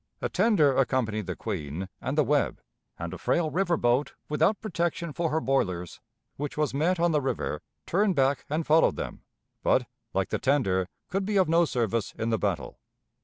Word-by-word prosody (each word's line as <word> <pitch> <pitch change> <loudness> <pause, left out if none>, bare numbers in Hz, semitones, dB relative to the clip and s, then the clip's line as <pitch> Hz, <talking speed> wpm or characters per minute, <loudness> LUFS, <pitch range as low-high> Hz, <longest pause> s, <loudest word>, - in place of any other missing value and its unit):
A - - -2
tender 155 - +3
accompanied 115 -6 +1
the - - -3
Queen 90 -3 -4
and 135 +4 -2
the 150 - +5
Webb, 145 +2 +1 0.4
and 85 +1 -5
a 95 - -7
frail 160 -3 +1
river 175 -2 +1
boat 120 +4 +1
without 160 +7 +2
protection 170 -5 -2
for 170 +1 0
her 155 +1 +1
boilers, 95 - -1 0.4
which 145 +1 -4
was 150 -3 0
met 165 +6 +1
on 170 0 +3
the 150 -2 +2
river, 135 - -2 0.2
turned 195 +1 +2
back 135 0 +2
and 155 +2 -1
followed 160 +2 +4
them, - - -5 0.4
but, - - +3 0.3
like - - 0
the - - -1
tender, 95 -10 +1 0.2
could 195 +1 0
be 205 +1 0
of 190 - +4
no 170 +2 +4
service 115 -6 -1
in 115 +1 -1
the 110 - +1
battle. 90 -9 -2
145 Hz, 185 wpm, -27 LUFS, 115-170 Hz, 0.4 s, the